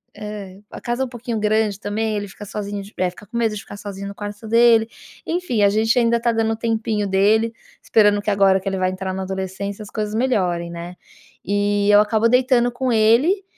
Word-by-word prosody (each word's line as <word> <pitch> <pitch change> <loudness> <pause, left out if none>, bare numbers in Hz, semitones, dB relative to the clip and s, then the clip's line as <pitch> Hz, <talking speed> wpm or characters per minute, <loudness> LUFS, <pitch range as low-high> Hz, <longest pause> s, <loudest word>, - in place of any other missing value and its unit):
é. 205 -3 -8
A - - -8
casa 240 +2 -1
é - - -2
pouquinho 240 -2 -5
grande, 215 -1 +1
também. 215 +1 -2
Ele 205 0 -3
fica 205 - -10
sozinho 205 0 -5
de 200 +2 -13
eh, 185 -1 +1
fica 205 +2 -15
com 235 +2 -6
medo 225 -2 +1
de 200 - -6
ficar 200 - -11
sozinho 200 -1 -7
no 200 - -8
quarto 205 +1 -7
dele. 230 0 +5 0.4
Enfim, 330 -11 -1
a 200 - +6
gente 220 +4 +1
ainda 235 0 +3
tá 235 0 +1
dando 225 0 0
o - - -3
tempinho 220 -2 -1
dele. 215 +4 +2 0.3
Esperando 205 -2 +3
que 210 - -1
agora 195 -1 +4
que 195 - -9
ele 190 - -3
vai 185 0 +1
entrar 185 0 -4
na 190 0 -4
adolescência, 190 +2 -5
as 205 - -11
coisas 215 -1 -3
melhorem, 180 -9 0
né. 170 +1 -7 0.5
E 205 0 +1
eu 205 - +7
acabo 220 +2 +2
deitando 250 -1 +3
com 255 +1 -2
ele 245 - +3
210 Hz, 215 wpm, -21 LUFS, 200-230 Hz, 0.5 s, eu